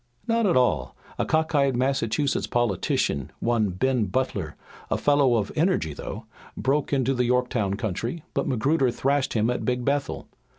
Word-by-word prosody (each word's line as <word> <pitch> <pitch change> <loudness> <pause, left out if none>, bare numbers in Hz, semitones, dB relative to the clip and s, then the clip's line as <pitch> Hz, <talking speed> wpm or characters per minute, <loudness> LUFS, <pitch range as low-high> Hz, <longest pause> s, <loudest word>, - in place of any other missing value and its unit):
"Not 230 -2 +2
at 175 - +3
all! 65 - +1 0.2
A - - 0
cock 160 +1 +1
eyed 140 -4 +2
Massachusetts 130 0 0
politician, 100 - 0
one 115 -3 +1
Ben 120 +5 +1
Butler, 100 - -2 0.3
a - - +1
fellow 145 -4 +3
of 105 -3 -1
energy 155 - +1
though, 110 +9 -7 0.3
broke 140 +2 0
into 135 -2 +2
the 125 -1 +1
Yorktown 120 -5 +1
country, 115 - -3
but 140 - -1
Magruder 135 +3 +2
thrashed 135 +3 0
him 115 +1 +2
at 125 - -3
Big 125 -1 -1
Bethel. 140 0 -1
125 Hz, 160 wpm, -25 LUFS, 110-140 Hz, 0.3 s, at